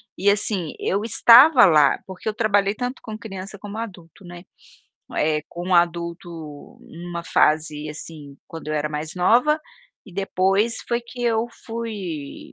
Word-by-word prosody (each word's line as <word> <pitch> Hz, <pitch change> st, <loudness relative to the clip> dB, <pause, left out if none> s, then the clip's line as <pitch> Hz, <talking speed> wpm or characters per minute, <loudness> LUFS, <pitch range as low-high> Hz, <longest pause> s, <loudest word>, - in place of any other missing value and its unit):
e 200 Hz, +3 st, +2 dB
assim 200 Hz, -5 st, 0 dB
eu 200 Hz, +2 st, -1 dB
estava 245 Hz, +4 st, +7 dB
lá 150 Hz, -6 st, +4 dB
porque 190 Hz, +2 st, -6 dB
eu -, -, -3 dB
trabalhei 205 Hz, -2 st, +1 dB
tanto 245 Hz, +3 st, -4 dB
com 220 Hz, -1 st, -7 dB
criança 200 Hz, -2 st, -8 dB
como 205 Hz, +1 st, -8 dB
adulto, 190 Hz, -5 st, -9 dB
né. 175 Hz, 0 st, -11 dB, 0.7 s
Eh, 150 Hz, 0 st, +1 dB
com 175 Hz, +2 st, -3 dB
adulto 170 Hz, 0 st, 0 dB, 0.5 s
numa 170 Hz, +1 st, -8 dB
fase 150 Hz, -1 st, +1 dB
assim, 150 Hz, -2 st, -9 dB
quando 160 Hz, -2 st, -9 dB
eu 155 Hz, -, -2 dB
era 150 Hz, 0 st, -1 dB
mais 155 Hz, +1 st, -4 dB
nova, 240 Hz, -, +3 dB, 0.5 s
e 195 Hz, -, -13 dB
depois 195 Hz, +3 st, +1 dB
foi 235 Hz, 0 st, 0 dB
que 240 Hz, +1 st, -9 dB
eu 230 Hz, -1 st, +1 dB, 0.2 s
fui 205 Hz, -11 st, -6 dB
190 Hz, 150 wpm, -22 LUFS, 165-220 Hz, 0.7 s, estava